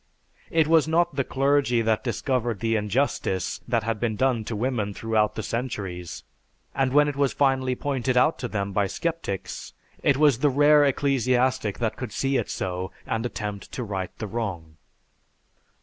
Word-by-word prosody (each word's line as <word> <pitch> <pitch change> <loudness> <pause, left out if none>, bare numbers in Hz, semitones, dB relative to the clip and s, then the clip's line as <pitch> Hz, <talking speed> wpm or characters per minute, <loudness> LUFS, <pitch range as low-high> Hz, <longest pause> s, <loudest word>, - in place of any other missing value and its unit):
It 160 -1 +3
was 160 -1 +4
not 170 -1 +2
the 135 - +1
clergy 135 -3 +2
that 110 -1 +1
discovered 120 -6 -1
the 115 +1 0
injustice 105 -3 -1
that 115 -3 +1
had 110 -1 -2
been 115 -3 -1
done 125 -1 +1
to 115 - -4
women 110 -3 -1
throughout 110 -1 +1
the 110 - -4
centuries, 95 -8 -4 0.5
and 135 -1 +1
when 150 +2 +5
it 145 - -2
was 140 -1 +1
finally 130 -2 +2
pointed 130 -2 -1
out 155 +6 +3
to 125 - -3
them 100 -3 -3
by 100 0 +1
sceptics, 160 - -4 0.3
it 140 - +3
was 145 -5 +4
the 145 - +3
rare 145 +2 +5
ecclesiastic 130 -5 +1
that 115 -3 -2
could 125 -4 -5
see 135 0 0
it - - -2
so 90 0 -3 0.2
and 115 +2 -1
attempt 105 -4 -6
to 125 - -3
right 95 -4 -3
the 110 - -4
wrong. 95 -8 -5
120 Hz, 170 wpm, -25 LUFS, 105-135 Hz, 0.5 s, when